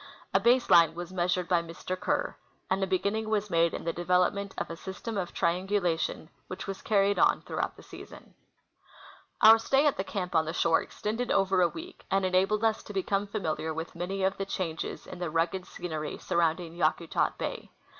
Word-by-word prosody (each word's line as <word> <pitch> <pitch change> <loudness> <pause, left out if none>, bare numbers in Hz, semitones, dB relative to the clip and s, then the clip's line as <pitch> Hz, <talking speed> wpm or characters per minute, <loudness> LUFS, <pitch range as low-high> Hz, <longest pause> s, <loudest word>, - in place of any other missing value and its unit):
A 195 - +5
base 240 +4 +3
line 165 -1 +6
Avas 175 +1 -6
measured 180 -1 0
by 175 -1 +3
Mr. 170 +2 -5
Kerr, - - -1 0.4
and 195 +1 +1
a - - 0
be 190 0 +2
ginning 215 +4 -2
Avas 210 -2 -1
made 165 0 +3
in - - -5
the 165 - -2
clcA^elopment 180 +3 +1
of - - -3
a - - -5
system 190 +6 -6
of 185 -3 -2
triangu 185 +4 0
lation 165 -3 -2 0.2
AA'hich 185 +1 -6
Avas 195 -1 -6
carried 200 -1 +2
on - - +3
throughout - - -3
the - - -15
season. - - -12 1.1
Our 225 0 +9
stay 270 +5 +2
at 290 - +2
the 190 - -1
camp 185 -2 -4
on 160 -1 +3
the 160 - -3
shore 165 -1 +3
extended 225 +3 -4
OA^er 190 -2 +3
a - - -7
Aveek, 355 +3 -9
and 195 0 +2
enabled 190 +4 +2
us 220 -1 +2
to 205 - -10
become 195 +1 0
familiar 160 -6 -3
Avith 160 +1 -5
many 190 +3 -3
of 190 0 +1
the 195 - -2
changes 170 -5 -4
in 180 - -9
the 175 -2 -2
rugged 165 +3 -1
scenery 155 -4 -5
surrounding 170 0 0
Yakutat 165 0 0
bay. - - -5
185 Hz, 200 wpm, -29 LUFS, 170-200 Hz, 1.1 s, Our